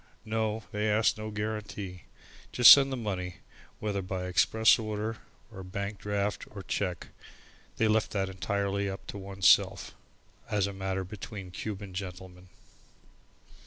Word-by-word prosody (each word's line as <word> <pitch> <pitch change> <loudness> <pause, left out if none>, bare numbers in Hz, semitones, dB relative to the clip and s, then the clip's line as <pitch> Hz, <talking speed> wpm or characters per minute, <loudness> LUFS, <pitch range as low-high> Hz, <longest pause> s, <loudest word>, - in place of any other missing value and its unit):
No, 110 0 -1
they 105 +1 0
asked 110 +1 +2
no 110 0 -5
guarantee. 105 -4 -5 0.5
Just 125 -1 +9
send 135 -1 +8
the 130 - -2
money 95 -6 -4 0.4
whether 105 -2 -2
by 90 0 -4
express 110 +6 +4
order 110 0 -3 0.3
or 95 -3 -9
by 90 - -10
bank 100 0 -4
draft 105 0 -2
or 100 -2 -9
cheque, 90 -2 -3 0.7
they 110 - +3
left 110 0 +2
that 95 -2 0
entirely 100 +1 -2 0.2
to - - -7
oneself, 95 -1 +3 0.6
as 105 -2 +1
a 100 - -4
matter 95 0 -3
between 95 0 -8
Cuban 100 0 -6
gentlemen. 90 -1 -8
100 Hz, 135 wpm, -29 LUFS, 95-110 Hz, 0.7 s, Just